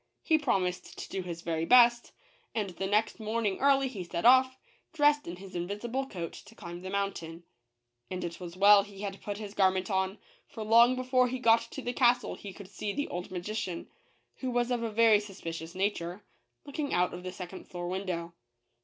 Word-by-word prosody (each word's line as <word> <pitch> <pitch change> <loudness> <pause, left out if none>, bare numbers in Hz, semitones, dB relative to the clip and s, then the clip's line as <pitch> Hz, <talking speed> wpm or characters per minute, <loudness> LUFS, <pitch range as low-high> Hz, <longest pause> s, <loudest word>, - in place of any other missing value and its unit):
He 315 -2 +3
promised 185 -10 -1
to - - -7
do 195 - -3
his 170 -2 -7
very 165 -1 -1
best, 240 +4 +5 0.4
and 210 -4 -1
the 190 +2 -4
next 210 +4 +1
morning 215 -2 -1
early 275 -1 +4
he 215 -8 -6
set 170 +1 -4
off, 260 +1 +6 0.4
dressed 295 -1 +3
in 170 - -5
his 190 +1 -12
invisible 210 +9 -3
coat, 170 -8 -6
to 210 +3 -13
climb 175 -2 -8
the 185 - -6
mountain. 190 -4 -3 0.7
And 185 - -4
it 170 -1 -5
was 175 -1 -8
well 200 +1 +8
he 200 -1 -11
had 195 -1 -5
put 205 -1 -4
his 205 -2 -7
garment 190 -1 +2
on; 190 +1 0 0.3
for 220 - -7
long 235 +3 +6
before 255 0 +2
he 255 +1 -3
got 230 -2 +5
to - - -7
the 245 - -2
castle 245 -1 +3
he 200 - -8
could 195 0 -11
see 205 -1 -4
the 285 - -2
old 175 0 -5
magician, 185 0 -4 0.5
who 260 - -3
was 245 0 0
of 240 -1 0
a 230 - -1
very 220 -1 +5
sus 205 -2 -10
picious 165 0 -6
nature, 190 -1 -2 0.4
looking 285 0 -3
out 180 0 +2
of 175 - -6
the 185 0 -5
second 185 0 -9
floor 175 -1 -5
window. 180 -2 -3
200 Hz, 200 wpm, -30 LUFS, 180-240 Hz, 0.7 s, well